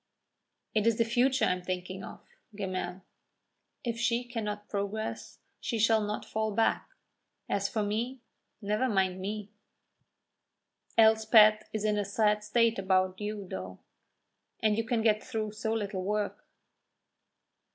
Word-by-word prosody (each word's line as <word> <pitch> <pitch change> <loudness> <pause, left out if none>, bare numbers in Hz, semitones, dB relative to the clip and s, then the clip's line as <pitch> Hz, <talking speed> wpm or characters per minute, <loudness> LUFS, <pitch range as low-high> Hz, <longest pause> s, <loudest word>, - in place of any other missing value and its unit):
"It 215 0 +2
is 230 -1 +3
the 230 - +3
future 250 +3 +2
I - - +2
am 180 0 -2
thinking 185 +1 -4
of, - - -9 0.3
Gemmell. 185 -2 -4 0.8
If 235 -2 -2
she 240 0 +1
cannot 210 -4 -4
progress, 205 +2 -4 0.2
she 235 - -2
shall 225 0 +4
not 210 0 -3
fall 220 0 -1
back. 225 - +1 0.6
As 200 0 0
for 215 -2 -1
me, 230 +6 -2 0.4
never 210 +6 +1
mind 190 -3 +1
me." 205 +1 -4 1.5
"Elspeth 220 -1 +6
is 215 -1 -2
in 210 -1 +2
a - - +1
sad 210 +1 +1
state 230 +1 +2
about 185 0 +1
you, 210 -2 -4
though! 95 - -6 0.8
And 215 -1 +2
you 225 +1 -1
can 230 -1 0
get 215 -1 +3
through 215 -1 -3
so 215 +1 -3
little 205 -4 -2
work." 205 +2 -2
210 Hz, 140 wpm, -30 LUFS, 200-225 Hz, 1.5 s, Elspeth